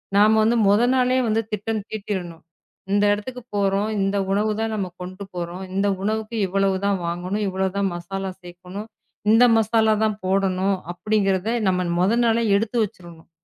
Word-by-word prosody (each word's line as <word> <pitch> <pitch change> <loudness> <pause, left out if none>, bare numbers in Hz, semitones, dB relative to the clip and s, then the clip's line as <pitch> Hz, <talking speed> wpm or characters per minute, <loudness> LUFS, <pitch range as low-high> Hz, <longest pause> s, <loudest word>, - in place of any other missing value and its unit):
நாம 215 +2 +5
வந்து 225 +2 +3
மொத 210 +4 +4
நாளே 255 0 +2
வந்து 220 +1 +2
திட்டம் 210 +1 -2
தீட்டிடணும். 190 -6 -5 0.5
இந்த 205 0 +3
இடத்துக்கு 250 +5 -6
போறோம். 200 +1 +1
இந்த 195 +1 0
உணவு 210 +2 +1
தான் 225 0 -1
நாம 195 -3 -2
கொண்டு 185 +2 -7
போறோம். 175 +1 -5
இந்த 200 +1 +1 0.2
உணவுக்கு 220 +2 -2
இவ்வளவு 195 +1 +1
தான் 200 -1 +2
வாங்கணும். 180 +5 -2
இவ்வளவு 190 0 -1
தான் 200 -1 +1
மசாலா 195 +2 -5
சேர்க்கணும். 180 +4 -9 0.4
இந்த 235 +2 +7
மசாலா 220 0 +3
தான் 215 -1 +1
போடணும் 190 0 +1 0.2
அப்படிங்கறத 195 +1 0 0.2
நம்ம 180 -1 +1 0.2
மொத 205 +6 +3
நாளே 230 0 +2
எடுத்து 225 +3 -2
வச்சிரனும். 170 -4 -9
200 Hz, 155 wpm, -22 LUFS, 185-220 Hz, 0.5 s, இந்த